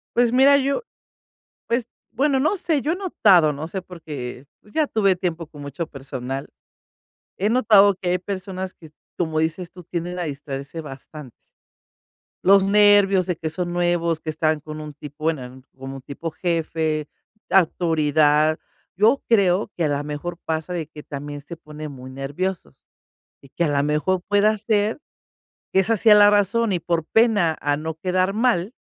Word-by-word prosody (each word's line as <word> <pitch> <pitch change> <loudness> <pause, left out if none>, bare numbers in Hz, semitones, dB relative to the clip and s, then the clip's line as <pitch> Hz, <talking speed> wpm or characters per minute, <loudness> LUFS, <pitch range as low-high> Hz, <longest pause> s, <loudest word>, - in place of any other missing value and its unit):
Pues 240 -1 +3
mira, 275 +2 +6
yo 280 - 0 0.8
pues, 235 0 0 0.3
bueno, 270 +3 +2
no 305 +10 +1
sé, 330 -5 0
yo 300 +4 -1
he 355 - -2
notado 195 - +4
no 145 +2 -6
sé, 185 +2 -5
porque, 145 -7 -8
pues, 210 - -21
ya 310 -2 +2
tuve 200 -6 +2
tiempo 170 -3 -3
con 145 -2 -12
mucho 145 +4 -5
personal. 135 -2 -6 0.9
He 205 +3 +1
notado 210 -5 +5
que 180 -1 -4
hay 180 - +2
personas 185 0 -5
que, 160 -3 -15 0.3
como 160 -3 -1
dices 165 +2 -2
tú, 180 -1 -12
tienden 175 +2 -4
a 175 - -1
distraerse 140 +1 -6
bastante. 145 -1 -10 1.1
Los 195 +1 +5
nervios 205 -2 +5
de 180 -1 -1
que 160 -1 -4
son 175 +2 -3
nuevos, 175 -2 0
que 155 - -5
están 155 -1 0
con 155 0 -8
un 150 -1 -8
tipo 145 +1 -10
bueno, 130 -5 -3 0.2
como 135 +1 -7
un - - -11
tipo 145 +5 -6
jefe, 160 -2 -2 0.4
autoridad. 155 -3 +3 0.4
Yo 225 +8 +3
creo, 200 -2 +2
que 170 - -1
a - - +2
la 145 0 -1
mejor 150 +4 -5
pasa, 160 +2 -3
de 165 -4 -3
que 150 -1 -12
también 145 0 -7
se 160 +3 -10
ponen 150 -1 -9
muy 130 -1 -10
nerviosos, 145 +8 -5 0.5
y 140 - -17
que 170 - -1
a - - +1
la 140 -1 +1
mejor 150 +5 0
pueda 205 +1 +3
ser, 215 +4 0 0.7
que 190 - +3
esa 220 +2 +2
sea 215 +1 +6
la 205 0 +7
razón, 205 +2 +2
y 180 - +1
por 165 -1 -1
pena 205 -5 +2
a 145 0 0
no 160 +2 -4
quedar 185 +3 0
mal, 225 -3 +1
170 Hz, 175 wpm, -22 LUFS, 150-200 Hz, 1.1 s, la